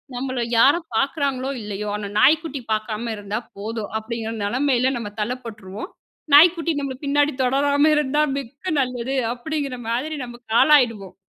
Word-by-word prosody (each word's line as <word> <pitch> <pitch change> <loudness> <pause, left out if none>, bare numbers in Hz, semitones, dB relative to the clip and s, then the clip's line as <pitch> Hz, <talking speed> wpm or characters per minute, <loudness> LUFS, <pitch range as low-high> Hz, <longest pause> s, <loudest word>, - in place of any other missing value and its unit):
நம்மள 255 -1 -2
யாரும் 320 +8 +4
பாக்குறாங்களோ 275 0 0
இல்லையோ, 210 0 -5
ஆனா 210 -1 -4
நாய்க்குட்டி 295 +1 +3
பாக்காம 215 +2 -2
இருந்தா 205 +2 -4 0.2
போதும் 220 +1 -5
அப்படிங்கிற 225 0 -5
நெலமைல 255 +3 +1
நம்ம 215 -3 -5
தள்ளப்பட்ருவோம். 220 - -5 0.4
நாய்க்குட்டி 330 +2 +6
நம்பள 275 -2 -4
பின்னாடி 290 +1 +2
தொடராம 285 +3 +3
இருந்தா 295 0 +1 0.2
மிக்க 275 +7 -6
நல்லது 255 0 -2 0.2
அப்படிங்கிற 280 +1 -4
மாதிரி 270 +7 -2
நம்பக்கு 240 -1 -11
ஆளாயிடுவோம். 230 -10 +3
255 Hz, 130 wpm, -22 LUFS, 225-285 Hz, 0.4 s, நாய்க்குட்டி